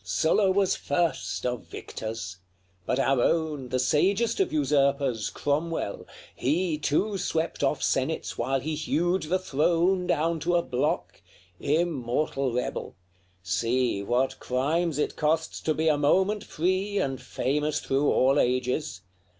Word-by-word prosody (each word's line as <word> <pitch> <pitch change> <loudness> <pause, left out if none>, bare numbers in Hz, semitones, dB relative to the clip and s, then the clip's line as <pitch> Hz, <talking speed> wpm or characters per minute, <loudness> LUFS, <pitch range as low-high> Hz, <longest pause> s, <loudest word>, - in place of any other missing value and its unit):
LXXXV. 90 - -13
Sylla 160 - +3
was 195 -1 +2
first 150 -3 -1
of 125 -8 -3
victors; 100 +1 -6 0.5
but - - +1
our 135 -1 +2
own, 150 -4 0
The 130 - 0
sagest 190 - +2
of 390 - +1
usurpers, 140 -5 +1
Cromwell! 150 -5 -2 0.3
he 155 +3 0
Too 195 +7 0
swept 165 -2 -2
off - - +1
senates - - -1
while 130 +3 -1
he 155 +3 -3
hewed 175 +4 0
the 170 +4 0
throne 175 +3 +1
Down 165 +2 +1
to 175 +3 0
a 170 - +3
block 125 - -2 0.4
immortal 140 -3 0
rebel! 125 +1 -3 0.5
See 115 +4 0
What 120 +6 0
crimes 150 +5 0
it 150 - -1
costs 160 +1 0
to 155 - 0
be 160 +1 0
a 150 -2 +3
moment 190 +8 +2
free 185 +5 -1
And 135 -7 -1
famous 150 +2 -1
through 135 +2 +1
all 135 +3 +3
ages! 125 +4 0
150 Hz, 140 wpm, -27 LUFS, 130-170 Hz, 0.5 s, Sylla